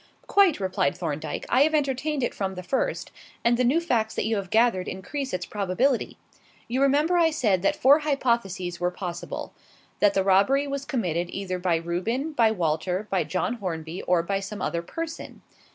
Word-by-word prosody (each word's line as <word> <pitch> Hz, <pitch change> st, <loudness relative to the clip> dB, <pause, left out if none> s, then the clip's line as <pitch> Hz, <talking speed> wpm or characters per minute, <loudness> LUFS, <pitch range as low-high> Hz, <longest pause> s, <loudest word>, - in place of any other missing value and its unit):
"Quite," 390 Hz, -, +4 dB
replied 185 Hz, -7 st, 0 dB
Thorndyke. 155 Hz, -2 st, -4 dB
"I 255 Hz, -, +3 dB
have 310 Hz, +2 st, +4 dB
entertained 285 Hz, 0 st, 0 dB
it -, -, -1 dB
from 190 Hz, -1 st, -3 dB
the 185 Hz, -, -6 dB
first; 270 Hz, -, -2 dB, 0.3 s
and 235 Hz, +1 st, +4 dB
the 250 Hz, -, +1 dB
new 265 Hz, +7 st, +3 dB
facts 235 Hz, -10 st, 0 dB
that -, -, -1 dB
you 220 Hz, 0 st, 0 dB
have 195 Hz, -2 st, -4 dB
gathered 220 Hz, -4 st, +2 dB
increase 270 Hz, +9 st, -4 dB
its 180 Hz, -1 st, -3 dB
probability. 210 Hz, +6 st, 0 dB, 0.5 s
You 255 Hz, +3 st, -1 dB
remember 295 Hz, +6 st, +3 dB
I 330 Hz, -1 st, +5 dB
said 215 Hz, -, +1 dB
that 195 Hz, -, +2 dB
four 280 Hz, +4 st, +5 dB
hypotheses 235 Hz, -, -1 dB
were 175 Hz, 0 st, +1 dB
possible: 175 Hz, -1 st, -6 dB, 0.5 s
that 205 Hz, -1 st, +4 dB
the 195 Hz, -, +3 dB
robbery 200 Hz, +9 st, +3 dB
was 280 Hz, -1 st, -4 dB
committed 175 Hz, -, -1 dB
either 185 Hz, -1 st, -4 dB
by 180 Hz, -2 st, +1 dB
Reuben, 185 Hz, -, -2 dB
by 235 Hz, -7 st, +3 dB
Walter, 180 Hz, 0 st, -1 dB
by 190 Hz, -2 st, +2 dB
John 210 Hz, +6 st, -2 dB
Hornby, 165 Hz, -3 st, -4 dB
or 175 Hz, -2 st, +2 dB
by 195 Hz, +3 st, -1 dB
some 195 Hz, +2 st, -6 dB
other 170 Hz, -, -1 dB
person. 330 Hz, -, -7 dB
205 Hz, 185 wpm, -25 LUFS, 180-275 Hz, 0.5 s, I